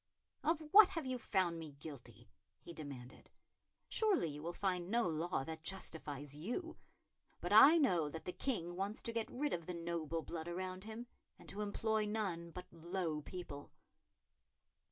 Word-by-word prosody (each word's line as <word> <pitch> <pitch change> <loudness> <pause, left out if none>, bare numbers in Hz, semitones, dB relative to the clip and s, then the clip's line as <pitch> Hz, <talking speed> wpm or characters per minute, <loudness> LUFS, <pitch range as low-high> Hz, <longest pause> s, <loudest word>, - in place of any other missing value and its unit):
"Of 325 0 +2
what 415 -1 +10
have 330 -6 -3
you 255 -1 -2
found 175 -6 +1
me 155 -3 -7
guilty?" 125 -6 -10 0.3
he 170 - -10
demanded. 140 -5 -9 0.6
"Surely 410 - +3
you 150 0 -7
will 170 +2 -3
find 180 -1 -1
no 235 +3 +3
law 165 -3 0
that 160 +2 -6
justifies 150 -5 -3
you; 245 - -4 0.6
but - - -1
I 310 +5 +10
know 180 - +3
that 160 +2 -7
the 180 - -2
King 175 -6 -2
wants 195 +3 -2
to 230 - -3
get 230 -1 -1
rid 290 +4 -1
of 170 -2 -3
the 180 - -3
noble 165 -1 -2
blood 165 -1 -5
around 185 +2 -4
him, 220 +2 -6 0.3
and - - -15
to 205 - -4
employ 215 +1 0
none 190 -6 -2
but 180 +2 -8
low 170 -2 -2
people." 150 -4 -7
175 Hz, 165 wpm, -38 LUFS, 160-220 Hz, 0.6 s, what